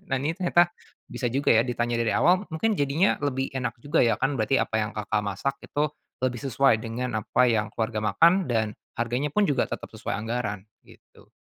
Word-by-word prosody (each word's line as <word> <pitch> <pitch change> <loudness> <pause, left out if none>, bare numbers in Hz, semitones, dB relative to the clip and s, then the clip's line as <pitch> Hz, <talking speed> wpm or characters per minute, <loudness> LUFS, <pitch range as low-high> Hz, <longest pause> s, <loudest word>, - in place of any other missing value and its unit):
Nah, 135 - 0
ini 155 +4 -2
ternyata 175 -2 +3 0.4
bisa 125 - -3
juga 140 +2 0
ya 115 +2 +4
ditanya 120 -1 -1
dari 115 -1 +1
awal 185 +3 +3
mungkin 210 +7 0
jadinya 145 +6 +2
lebih 135 -1 -1
enak 125 -1 -2
juga 145 - +1
ya 115 - +2
kan, 135 +1 +1
berarti 115 +3 +2
apa - - -1
yang, 105 0 -2
Kakak, 105 0 -1
masak 100 +8 -2
itu 150 +1 -1 0.3
lebih 125 -2 -1
sesuai 135 -2 +3
dengan 120 +1 -3
apa 125 +4 +2
yang 110 -2 0
keluarga 110 -1 -2
makan 180 +3 +5
dan 110 -3 0 0.2
harganya 120 +5 -2
pun 210 +2 +2
juga 135 -3 +2
tetap - - -6
sesuai - - -5
anggaran 110 -3 -3 0.2
gitu. - - -20
125 Hz, 195 wpm, -26 LUFS, 115-145 Hz, 0.4 s, makan